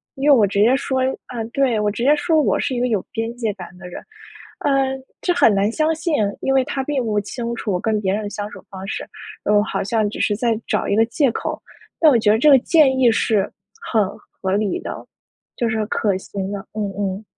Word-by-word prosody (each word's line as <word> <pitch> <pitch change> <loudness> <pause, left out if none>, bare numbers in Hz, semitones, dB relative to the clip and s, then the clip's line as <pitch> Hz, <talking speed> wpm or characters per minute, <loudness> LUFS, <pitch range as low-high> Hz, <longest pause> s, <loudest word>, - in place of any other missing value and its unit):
因 275 +2 +1
为 285 - +8
我 220 -5 +5
直 200 0 -1
接 235 +5 +5
说， 265 -1 -1 0.3
啊， 240 -2 -5
对 260 -5 +2
我 210 0 +1
直 220 +3 -4
接 285 +4 +5
说： 325 -1 +2
“我 - - +1
是 260 - -1
一 - - -1
个 250 - +2
有 215 -5 0
边 225 +1 -3
界 225 -4 -1
感 185 -3 -9
的 180 -1 -10
人，” 180 - -9 0.6
呃， 290 - 0 0.5
这 355 - +1
很 230 - +4
难 200 +2 +2
相 310 +5 +1
信， 320 +1 -2 0.3
因 270 - +1
为 265 - +4
他 270 +1 -3
并 280 -1 -1
不 210 -2 0
清 235 +3 -5
楚 220 - -3
我 180 - 0
跟 215 +1 0
别 190 -2 0
人 215 +1 -2
的 205 - -4
相 205 0 -5
处 - - -11
方 190 -2 -8
式， 195 - -5 0.4
嗯， 210 0 +4
好 220 - -3
像 215 +1 0
只 - - -8
是 205 - +1
在 225 0 0
找 - - 0
一 - - +1
个 225 +2 +4
借 245 +3 +1
口。 - - -4 0.4
但 315 -3 +7
我 240 - +4
觉 215 - +2
得 215 - +5
这 300 +6 +4
个 275 -2 +8
建 270 -1 +3
议 250 -2 +5
是 220 -3 +1 0.3
很 215 -3 +1 0.4
合 190 - -1
理 205 0 0
的， - - -7 0.5
就 235 - 0
是 220 -1 -1
可 205 -2 0
行 195 0 -5
的。 205 - -3
嗯 215 0 -2
嗯。 200 0 -2
225 Hz, 260 characters per minute, -20 LUFS, 205-265 Hz, 0.6 s, 为